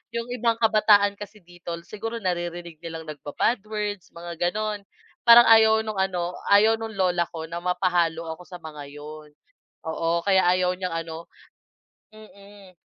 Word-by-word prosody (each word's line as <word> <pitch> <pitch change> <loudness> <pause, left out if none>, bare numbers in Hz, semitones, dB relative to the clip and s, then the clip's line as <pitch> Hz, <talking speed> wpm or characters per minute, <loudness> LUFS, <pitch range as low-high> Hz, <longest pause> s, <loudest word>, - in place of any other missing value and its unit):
yung 235 +1 -3
ibang 235 -2 +1
kabataan 210 -2 +4
kasi 210 +1 -10
dito 175 -1 -8
siguro 225 +4 -6
naririnig 175 -3 -4
nilang 165 -1 -6
nagba-bad 155 - -1
words, 210 -4 -4
mga 170 -1 -8
ganun. 215 -1 -3 0.4
Parang 235 0 +9
ayaw 220 -1 +6
nung 215 -1 -4
ano, 180 -2 -2 0.2
ayaw 215 +2 +6
nung 225 0 -5
lola 180 -2 +2
ko 160 -1 -7
na 170 +1 -6
mapahalo 175 -2 0
ako 180 - -16
sa 180 0 -10
mga 150 -3 -9
yun. 150 +1 -10 0.6
Oo, 165 +1 0
kaya 190 -2 +4
ayaw 180 0 +2
niyang 180 -1 -4
ano 165 +1 -9 0.8
mm. 200 -3 -16
185 Hz, 150 wpm, -24 LUFS, 170-215 Hz, 0.8 s, Parang